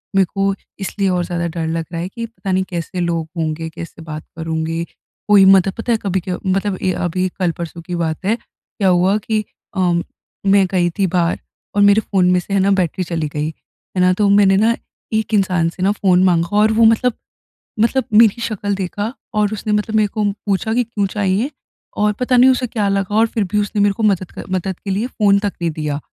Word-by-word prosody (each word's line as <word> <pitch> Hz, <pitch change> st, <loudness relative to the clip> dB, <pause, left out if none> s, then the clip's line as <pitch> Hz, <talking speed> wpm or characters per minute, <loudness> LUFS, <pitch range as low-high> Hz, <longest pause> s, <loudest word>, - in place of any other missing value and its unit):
मेरे 195 Hz, -, +5 dB
को 195 Hz, 0 st, +1 dB, 0.3 s
इसलिए 195 Hz, 0 st, -1 dB
और 180 Hz, -1 st, +1 dB
ज़्यादा 170 Hz, -1 st, -2 dB
डर 165 Hz, -1 st, -2 dB
लग 165 Hz, 0 st, -2 dB
रहा 170 Hz, -1 st, -3 dB
है 180 Hz, -, -4 dB
कि 230 Hz, +3 st, -5 dB
पता 220 Hz, -4 st, -6 dB
नहीं, 190 Hz, 0 st, +2 dB
कैसे 175 Hz, +1 st, -4 dB
लोग 170 Hz, -2 st, -1 dB
होंगे, 160 Hz, 0 st, -2 dB
कैसे 165 Hz, 0 st, -9 dB
बात 155 Hz, -1 st, -7 dB
करेंगे। 160 Hz, 0 st, -2 dB, 0.4 s
कोई 205 Hz, -2 st, +7 dB
मतलब 195 Hz, 0 st, +5 dB
पता 235 Hz, +1 st, -3 dB
है, 225 Hz, -, +3 dB
कभी 190 Hz, -2 st, 0 dB
क्य 180 Hz, -, -2 dB
मतलब 195 Hz, +1 st, 0 dB
ये 185 Hz, -, +1 dB
अभी 185 Hz, +2 st, 0 dB
कल-परसों 170 Hz, -2 st, -3 dB
की 175 Hz, +1 st, -5 dB
बात 165 Hz, +1 st, -2 dB
है, 215 Hz, +4 st, +2 dB
क्या 205 Hz, -3 st, -6 dB
हुआ 185 Hz, +3 st, +3 dB
कि 215 Hz, 0 st, -1 dB, 0.3 s
अ, -, -, 0 dB, 0.7 s
मैं 195 Hz, 0 st, +5 dB
गई 175 Hz, -2 st, +2 dB
थी 195 Hz, -, +4 dB
बाहर 175 Hz, -1 st, 0 dB, 0.4 s
और 205 Hz, -, +3 dB
मेरे 205 Hz, +2 st, +5 dB
फ़ोन 185 Hz, -4 st, +1 dB
में 180 Hz, -, +3 dB
से 195 Hz, -, -6 dB
है 200 Hz, -, +3 dB
ना, 195 Hz, +1 st, +3 dB
बैटरी 185 Hz, 0 st, 0 dB
चली 165 Hz, -3 st, -2 dB
गई, 150 Hz, +1 st, -1 dB, 0.5 s
है -, -, +3 dB
ना? 180 Hz, -, +5 dB
तो 205 Hz, +2 st, +1 dB
मैंने 200 Hz, -1 st, +5 dB
ना, 225 Hz, +3 st, +3 dB, 0.4 s
एक 220 Hz, 0 st, -1 dB
इंसान 180 Hz, -5 st, +2 dB
से 180 Hz, +2 st, -6 dB
ना 195 Hz, -, +3 dB
फ़ोन 185 Hz, -3 st, +3 dB
माँगा 175 Hz, +1 st, +2 dB
और 215 Hz, +1 st, +4 dB
वो 225 Hz, -, +7 dB
मतलब 225 Hz, +2 st, +3 dB, 0.7 s
मतलब 255 Hz, +4 st, +2 dB
मेरी 225 Hz, +1 st, +5 dB
शकल 205 Hz, -3 st, -2 dB
देखा 205 Hz, +5 st, -3 dB, 0.2 s
और 210 Hz, 0 st, +1 dB
उसने 210 Hz, 0 st, -2 dB
मतलब 210 Hz, +1 st, -1 dB
मेरे 215 Hz, -1 st, +4 dB
को 210 Hz, +1 st, -3 dB, 0.2 s
पूछा 205 Hz, +2 st, 0 dB
कि, 245 Hz, -, +2 dB
"क्यों 220 Hz, -3 st, -2 dB
चाहिए?" 205 Hz, +5 st, 0 dB, 0.5 s
और 210 Hz, 0 st, +2 dB
पता 250 Hz, 0 st, +2 dB
नहीं, 255 Hz, +2 st, +7 dB
उसे 250 Hz, 0 st, 0 dB
क्या 215 Hz, -3 st, -1 dB
लगा 195 Hz, +1 st, -1 dB
और 225 Hz, +1 st, +4 dB
फिर 220 Hz, -1 st, -1 dB
भी 210 Hz, -, +2 dB
उसने 205 Hz, 0 st, -1 dB
मेरे 200 Hz, 0 st, +3 dB
को 220 Hz, -, -4 dB
मदद 190 Hz, -4 st, +1 dB
कर -, -, -8 dB
मदद 185 Hz, 0 st, -2 dB
के 200 Hz, -, -7 dB
लिए 210 Hz, +6 st, -1 dB
फ़ोन 200 Hz, -5 st, +2 dB
तक 205 Hz, -1 st, -2 dB
नहीं 170 Hz, -1 st, 0 dB
दिया। 150 Hz, -2 st, -3 dB
195 Hz, 225 wpm, -18 LUFS, 175-210 Hz, 0.7 s, कोई